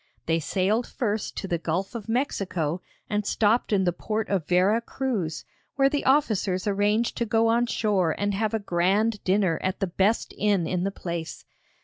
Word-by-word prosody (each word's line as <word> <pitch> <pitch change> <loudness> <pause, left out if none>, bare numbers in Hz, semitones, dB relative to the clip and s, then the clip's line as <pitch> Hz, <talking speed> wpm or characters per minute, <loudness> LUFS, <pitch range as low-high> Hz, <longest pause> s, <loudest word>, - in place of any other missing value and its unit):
They 165 0 +1
sailed 195 +8 0
first 215 -3 -3
to 195 - -3
the 170 -2 -1
Gulf 170 +4 -2
of 225 -3 -7
Mexico 185 - -1 0.3
and 210 0 -1
stopped 220 +3 +1
in 195 -2 +3
the 175 -1 +1
port 215 +4 -3
of 190 -6 -1
Vera 190 +6 +3
Cruz, 230 - -3 0.3
where 275 0 +4
the 290 - -1
officers 215 -9 +2
arranged 210 +3 +1
to 235 - 0
go 225 +1 +3
on 235 +1 +2
shore 195 -8 +1
and 205 0 0
have 215 +2 0
a - - +3
grand 200 +3 +1
dinner 185 -3 +2
at 185 0 -2
the 195 - +1
best 195 +5 0
inn 200 -4 +2
in 180 +1 -1
the - - +1
place. 170 -4 -6
205 Hz, 185 wpm, -26 LUFS, 180-225 Hz, 0.3 s, where